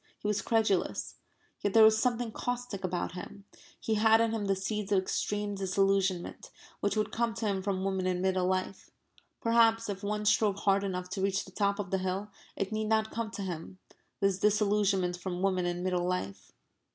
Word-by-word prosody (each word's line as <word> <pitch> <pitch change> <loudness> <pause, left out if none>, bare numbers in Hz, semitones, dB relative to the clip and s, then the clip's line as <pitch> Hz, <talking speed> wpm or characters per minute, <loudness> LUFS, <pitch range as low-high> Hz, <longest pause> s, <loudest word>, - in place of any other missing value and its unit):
He - - -5
was 210 -1 +1
credulous. 220 -5 0 0.4
Yet 205 0 -2
there 225 - +9
was 220 0 +6
something 240 -2 0
caustic 245 -4 -4
about 180 -1 -2
him. 190 +2 -9 0.3
He 220 - -1
had 220 +1 +5
in 230 0 +2
him 220 -2 -2
the 195 0 +2
seeds 205 +1 -3
of 200 - +4
extreme 205 +2 -1
disillusionment, 195 -1 0 0.3
which 205 +2 0
would 215 - 0
come 230 -1 -1
to 225 - -3
him 195 -2 0
from 190 -1 -2
women 190 -1 -1
in 180 -1 0
middle 185 -1 +1
life. 185 +1 -2 0.5
Perhaps 230 -1 +3
if 195 -1 -4
one 210 +1 -2
strove 210 -1 +3
hard 195 0 +3
enough 180 -2 -3
to 195 - -3
reach 195 0 0
the 190 - -13
top 200 +1 0
of 200 -3 -5
the 190 - +1
hill 190 +3 -3 0.2
it 195 +1 -3
need 215 0 -1
not 220 0 +1
come 230 -1 -3
to 215 -2 -6
him 180 0 -6 0.4
this 195 -1 +2
disillusionment 200 -3 +2
from 180 0 -4
women 185 -2 +1
in 175 0 -2
middle 180 -1 0
life. 100 - -4
200 Hz, 195 wpm, -30 LUFS, 185-215 Hz, 0.5 s, there